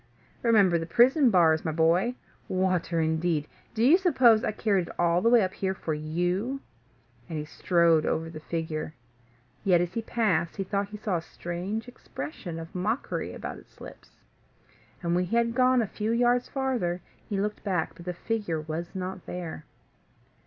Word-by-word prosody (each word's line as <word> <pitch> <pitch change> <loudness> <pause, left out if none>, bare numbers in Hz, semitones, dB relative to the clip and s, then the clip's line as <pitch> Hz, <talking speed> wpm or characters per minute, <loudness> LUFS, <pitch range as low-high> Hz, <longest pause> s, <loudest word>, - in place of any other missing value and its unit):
Remember 200 -7 +4
the 165 - -5
prison 250 - +5
bars, 165 -6 +4
my 160 - -1
boy. 170 +9 +2 0.3
Water 185 -2 0
indeed! 160 -1 0 0.3
Do 225 - +1
you 310 +9 +6
suppose 255 - +5
I - - 0
carried 200 -5 0
it - - -10
all 170 0 +2
the 230 - +4
way 235 -3 +6
up 185 - -2
here 190 -1 -2
for 160 - -3
you?" 175 - -1 0.7
And 160 - -4
he 150 - -3
strode 170 0 +3
over 160 +1 -1
the 165 -1 -8
figure; 155 -1 -4 0.7
yet, 180 -3 +4
as 175 +1 -1
he 230 - -1
passed, 185 -8 0
he 195 - -2
thought 200 +1 -1
he 210 - -7
saw 205 -4 -1
a - - -4
strange 180 +7 -5
expression 160 - -7
of 165 0 -8
mockery 210 +8 -2
about - - -6
its - - -22
lips. - - -12 0.9
And, 170 0 0
when 180 +1 +2
he 190 - -2
had 235 0 +2
gone 255 0 +4
a - - -3
few 215 +3 -3
yards 245 +1 +2
farther, 245 -11 -1 0.3
he 200 - -1
looked 210 +1 -2
back; 180 -6 -1
but 170 0 -13
the 180 - -3
figure 205 -5 -2
was 160 +3 -5
not 185 -1 -5
there. 170 -4 -6
185 Hz, 180 wpm, -27 LUFS, 165-225 Hz, 0.9 s, you